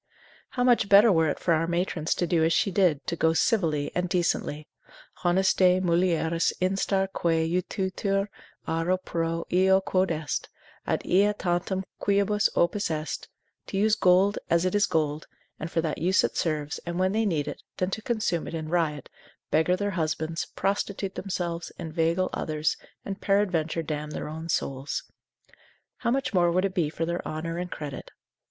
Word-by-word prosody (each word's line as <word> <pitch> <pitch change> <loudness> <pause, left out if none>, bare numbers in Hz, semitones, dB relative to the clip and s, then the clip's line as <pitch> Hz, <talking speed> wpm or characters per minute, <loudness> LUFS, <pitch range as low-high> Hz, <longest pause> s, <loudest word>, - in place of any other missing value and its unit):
How 245 - +3
much 240 -5 +3
better 205 +3 +8
were 160 -3 +3
it - - -2
for 170 - +1
our 165 +1 +1
matrons 170 -2 -1
to 175 - 0
do 165 -1 +2
as 165 - +3
she 195 +4 +2
did, 175 -6 +2
to - - -2
go 160 0 +2
civilly 160 -6 +1
and 180 0 -1
decently, 170 -4 -1 0.6
Honestae 185 0 +4
mulieris 170 -2 +1
instar 195 +1 +1
quae 165 -1 +1
utitur 190 +3 -1 0.4
auro 165 +3 +1
pro 165 -2 -2
eo 190 +1 +5
quod 190 0 +1
est, 155 -3 -3 0.4
ad - - -1
ea 200 +3 +3
tantum 185 0 -1 0.2
quibus 200 +1 +2
opus 190 +3 +1
est, 155 -2 -3 0.4
to - - -3
use 215 +2 +3
gold 190 +2 +4
as 170 +1 +3
it 185 - 0
is 205 0 +3
gold, 155 -3 -1 0.3
and 155 - -4
for 165 - 0
that 160 -2 -2
use 185 +3 +3
it - - -1
serves, 150 -2 -1
and 170 0 -5
when 185 +1 +2
they 220 +2 +1
need 165 -9 0
it, - - -6 0.2
than 185 +1 -1
to 220 - -3
consume 215 -9 -1
it - - -5
in 155 -1 -4
riot, 155 -5 0 0.4
beggar 160 +4 +3
their 205 +2 -2
husbands, 160 -1 -2
prostitute 195 0 -1
themselves, 175 -3 -4
inveigle 165 +3 0
others, 155 0 -1 0.3
and 195 0 -5
peradventure 175 -5 +1
damn 150 -1 -4
their 150 - -5
own 160 +2 -7
souls? 135 -2 -2 0.9
How 235 - -1
much 270 -1 0
more 175 -2 +4
would 185 +3 +2
it 195 - -2
be 170 -6 +1
for 165 +1 -3
their 170 +1 -2
honour 165 +2 -4
and 180 0 -4
credit? 145 -5 -7
175 Hz, 175 wpm, -27 LUFS, 160-190 Hz, 0.9 s, better